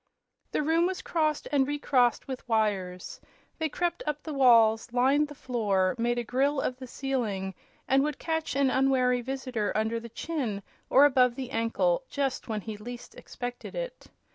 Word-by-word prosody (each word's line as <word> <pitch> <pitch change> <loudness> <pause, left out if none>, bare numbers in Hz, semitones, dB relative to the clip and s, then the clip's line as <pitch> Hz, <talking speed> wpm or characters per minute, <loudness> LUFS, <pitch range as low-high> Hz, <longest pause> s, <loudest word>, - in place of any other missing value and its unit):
The - - 0
room 325 +3 +3
was 375 0 -4
crossed 310 -3 0
and 275 -2 +3
recrossed 270 -4 +1
with 260 -2 -7
wires. 195 -5 -1 0.4
They 320 -1 0
crept 345 +3 -2
up 300 0 -2
the 310 - -5
walls, 230 -4 +5
lined 270 +5 +3
the 295 - -11
floor, 205 -8 0
made 240 +1 +1
a 240 - 0
grille 270 +5 +1
of 255 -1 -2
the 260 - -8
ceiling 225 -9 -2 0.3
and 270 +1 +4
would 295 0 -1
catch 320 -2 -2
an 275 -1 +3
unwary 255 -2 +2
visitor 255 -4 -3
under 220 +2 0
the 235 0 -9
chin 235 -6 -3 0.3
or 275 +2 +7
above 255 -3 +4
the 255 -1 -6
ankle 245 - +1
just 275 -2 -2
when 215 -2 -2
he 215 +1 -6
least 240 +3 -9
expected 245 0 -7
it. - - -6
255 Hz, 170 wpm, -28 LUFS, 230-290 Hz, 0.4 s, or